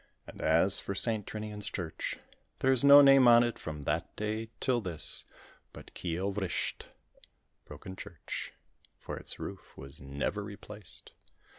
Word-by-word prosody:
And - - -11
as 85 +5 +6
for 100 - -5
St. 110 0 0
Trinian's 105 -1 -5
Church, 80 -5 -4 0.4
there 130 - +2
is 130 -1 +3
no 140 0 +10
name 135 -2 +7
on 120 0 +7
it 120 -1 -3
from 75 -2 -7
that - - -2
day 110 +1 -3
till 125 -3 +1
this 90 -6 -4 0.5
but - - -13
Keeill 90 +3 -3
Vrisht 95 -3 -3 0.8
Broken 95 - -10
Church 80 -7 -7 0.5
for - - -7
its - - -3
roof - - -9
was 70 0 -11
never 70 +9 -3
replaced. 105 -1 -11
105 Hz, 145 wpm, -30 LUFS, 85-115 Hz, 0.8 s, no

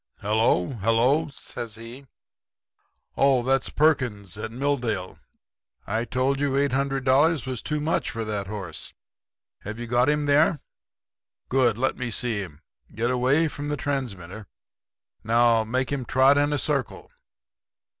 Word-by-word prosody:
"'Hello, 105 -4 +2
hello!' 120 +7 +2
says 120 -5 -7
he. 120 +5 -11 1.1
'Oh, 135 -3 +3
that's 135 +2 +1
Perkins, 120 - +1
at 110 +2 -5
Milldale. 120 -7 -2 0.7
I 110 +3 -1
told 130 +3 0
you 140 -2 0
$800 135 +2 +2
was 130 -3 -4
too 150 -1 -2
much 155 +3 -1
for 115 0 -4
that 105 -2 -3
horse. 100 -4 -7 0.7
Have 105 +3 -7
you 120 - -5
got 120 +3 +2
him 150 0 +1
there? 150 +2 +3 0.9
Good. 125 -4 +2
Let 130 +2 0
me 125 -2 -3
see 115 -1 -1
him. 80 -6 -8 0.3
Get 115 +3 0
away 130 +6 +2
from 145 -1 -6
the 145 0 -2
transmitter. 110 -9 -4 0.8
Now 115 0 +3
make 130 +4 -2
him 135 -3 -2
trot 130 +4 +4
in 145 +1 +2
a 145 - +1
circle. 145 - -2
125 Hz, 135 wpm, -25 LUFS, 110-140 Hz, 1.1 s, trot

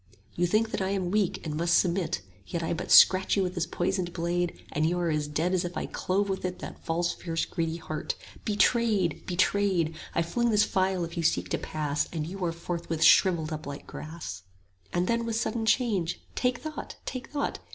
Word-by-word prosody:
30 - - -7
You 175 - +4
think 220 +4 +2
that - - -2
I 190 - 0
am 190 -3 -1
weak 205 -5 0
and 150 -2 -3
must 170 +2 +3
submit 175 - +1 0.3
Yet 170 -1 -3
I 165 - 0
but 170 +2 -5
scratch 190 +2 +7
you 195 - +3
with 180 -1 -2
this 175 -2 -1
poisoned 175 0 -1
blade, 175 0 -1
And 155 - 0
you 175 +2 0
are 170 -2 +1
dead 150 +4 -1
as 185 - +2
if 175 0 -4
I - - -2
clove 200 +2 -1
with 190 -1 -2
it 180 -1 -2
That - - -9
false 175 +1 0
fierce 165 -2 -2
greedy 165 -2 -2
heart. 155 -2 -4 0.3
Betrayed! 210 - +2
betrayed! 185 -2 +2 0.2
I 170 - +3
fling 235 +8 0
this 210 -2 +4
phial 190 -1 +1
if 170 +1 -9
you - - +1
seek 160 - +1
to - - 0
pass, 150 -2 -1
35 170 - -8
And 150 - -1
you 195 -1 -5
are 170 - +1
forthwith 170 -1 -3
shrivelled 165 -2 +5
up 155 -2 -6
like 140 0 -7
grass. 155 - -7 0.5
And 175 +1 +1
then 235 0 +1
with 230 -1 -2
sudden 225 0 -1
change, 200 -10 +1
Take 250 0 +1
thought! 310 +2 -7
take 255 -1 -5
thought! 285 -1 -2
175 Hz, 215 wpm, -28 LUFS, 165-195 Hz, 0.5 s, scratch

